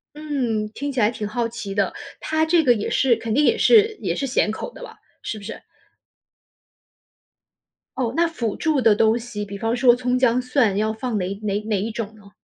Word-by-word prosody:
嗯， 255 -8 -2
听 285 +4 -4
起 260 -3 -2
来 210 0 +4
挺 215 -2 -5
好 230 +1 -1
奇 220 -4 -6
的。 200 -1 0 0.3
他 315 0 0
这 330 0 +3
个 250 - +6
也 210 - -3
是 260 -3 +3
肯 225 -1 -3
定 295 - +3
也 - - +3
是 440 -1 +5
也 - - -1
是 275 - -2
咸 250 -4 +1
口 220 - -6
的 - - -12
吧， - - -10 0.3
是 220 - -5
不 200 - -12
是？ 225 - -8 2.3
哦， 245 -3 -1
那 340 - +3
辅 235 -10 -3
助 310 -5 +1
的 225 -3 +5
东 220 +2 +3
西， 220 -3 -6
比 200 0 -8
方 225 +3 -1
说 245 -1 +5
葱、 250 +1 -1
姜、 250 -1 +3
蒜， 250 -5 +1
要 215 +1 0
放 220 -1 -3
哪 180 - -2 0.2
哪 205 0 -1
哪 215 -3 -1
一 220 - -3
种 220 -1 -5
呢？ 205 -2 -17
230 Hz, 225 characters per minute, -22 LUFS, 215-265 Hz, 2.3 s, 个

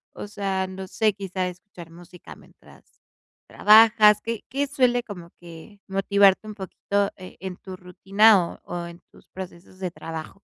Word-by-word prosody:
o - - -7
sea, 195 -2 -3
no 190 0 -8
sé, 215 +2 +1
quizá 190 -2 -4
escuchar 180 -1 -11
música 175 +1 -14
mientras - - -20 0.6
trabajas, 215 -1 +6
¿qué 230 -1 -5
qué 275 +4 -2
suele 250 -3 +1
como 175 -6 -10
que 175 +4 -13
motivarte 195 +1 +3
un 215 - -7
poquito, 200 +1 -2
eh, 185 -1 -12
en 185 -1 -6
tu 190 -1 -10
rutina 190 +1 +3
o - - -12
o 175 0 -6
en 170 +1 -13
tus - - -21
procesos 185 0 -11
de 185 -2 -4
trabajo? 165 +2 -8
190 Hz, 160 wpm, -24 LUFS, 180-210 Hz, 0.6 s, trabajas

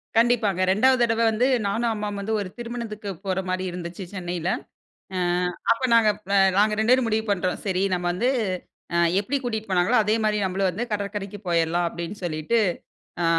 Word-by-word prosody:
கண்டிப்பாங்க. 225 -5 +3
2வது 255 +6 +4
தடவ 230 -1 +1
வந்து 230 +4 +2 0.2
நானும் 230 +3 0
அம்மாவும் 210 -1 -4
வந்து 220 +3 -2
ஒரு 190 - -5
திருமணத்துக்கு 230 -3 -5 0.2
போற 190 -1 0
மாரி 185 0 -1
இருந்துச்சு 175 +2 -6
சென்னைல. 175 -2 -3 0.7
ஆ - - 0 0.5
அப்ப 230 - -3
நாங்க 225 -2 +5 0.5
நாங்க 210 +1 +4
2 225 +3 +4
பேரும் 255 -2 +3
முடிவு 220 0 0
பண்றோம். 185 -2 0
சரி 190 -1 0
நம 175 -1 -1
வந்து, 215 +8 0 0.7
அ, - - +2 0.2
எப்டி 210 +8 -2
கூட்டிட்டு 220 -3 -3
போனாங்களோ 185 +6 +3
அதே 215 +1 +1
மாரி 210 0 +2
நம்மளும் 190 0 0
வந்து 210 +7 -3
கடற்கரைக்கு 205 0 -4
போயிரலாம் 170 0 +1
அப்டின்னு 170 +4 -6
சொல்லிட்டு, 155 +7 0 0.7
ஆ, - - +2
205 Hz, 165 wpm, -24 LUFS, 185-225 Hz, 0.7 s, நாங்க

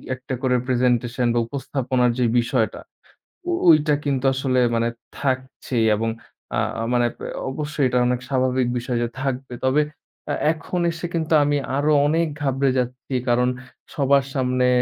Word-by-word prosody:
একটা 130 +1 -7
করে 130 -1 +2
প্রেজেন্টেশন 125 -1 +1
বা 120 - +2
উপস্থাপনার 130 -2 0
যে 125 - +3
বিষয়টা, 120 -1 0 0.9
ওইটা 155 -1 +5
কিন্তু 135 -2 0
আসলে 130 -1 0 0.2
মানে 115 0 +1 0.3
থাকছেই 130 -3 -1
এবং 115 +1 -1 0.5
আ - - +2 0.3
মানে 120 -1 +3 0.4
অবশ্যই 145 -1 -1
এটা 125 0 +2
অনেক 125 0 0
স্বাভাবিক 130 -1 +1
বিষয় 120 0 -2
যে, - - 0
থাকবে। 135 -1 -3
তবে 140 +3 +3 0.5
এ - - +1 0.2
এখন 175 +3 -4
এসে 170 +1 -6
কিন্তু 160 -1 0
আমি 145 0 +1 0.2
আরো 150 +2 +2 0.2
অনেক 165 +2 +2
ঘাবড়ে 135 -1 +1
যাচ্ছি, 125 +2 -4 0.2
কারণ 125 +1 +3 0.5
সবার 140 -1 +3
সামনে 125 -1 +1
130 Hz, 140 wpm, -22 LUFS, 125-140 Hz, 0.9 s, ওইটা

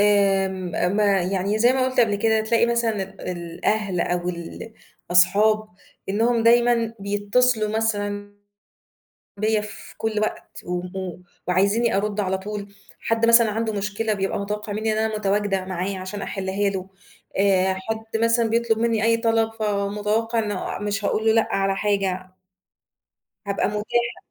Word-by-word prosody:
آمم 195 -2 +2
ما 200 -3 +3
يعني 195 +3 -1
زي 240 +3 +5
ما 260 -1 +1
قُلت 255 - +1
قبل 220 -3 +3
كده 220 +1 +2
تلاقي 230 +1 +2
مثلًا 235 -3 0
ال 195 +1 -10
الأهل 180 +3 -2
أو 175 +1 -1
الأصحاب، 195 +3 0 0.4
إنهم 230 +3 +2
دايمًا 235 -1 +3
بيتصلوا 210 +3 +1
مثلًا 205 -2 -2 1.0
بيّا 215 +1 +1
في 210 0 -10
كلّ 220 -1 -1
وقت، 215 - -4
و 180 0 -2
و 180 0 -6 0.3
وعايزيني 200 +5 +2
أرُد 210 +1 -1
على 190 -1 -1
طول، 200 0 -7 0.3
حد 225 0 +1
مثلًا 235 -1 +6
عنده 220 +1 -1
مشكلة 210 +2 -2
بيبقى 195 -1 -2
متوقّع 210 +1 -4
مِنّي 220 +1 -1
إن 215 - -1
أنا 220 0 0
متواجدة 200 -1 0
معايا 185 +1 -3
عشان 190 +2 -6
أحلّها 195 +1 -1
له، 190 -1 -5 0.5
آآ 190 -1 +3
حد 220 +3 -4
مثلًا 230 0 +3
بيطلب 230 -1 +1
مِنّي 225 -2 +1
أي 230 0 +4
طلب 225 -1 +1
فمتوقع 210 +1 -1
إنه 210 -3 -2
مش 205 0 -3
هاقول 220 +2 0
له 220 - +6
لأ 225 0 +2
على 195 0 +1
حاجة. 190 -3 -1 1.1
هابقى 200 - 0
متاحة. 235 +3 -1
210 Hz, 145 wpm, -23 LUFS, 195-225 Hz, 1.1 s, مثلًا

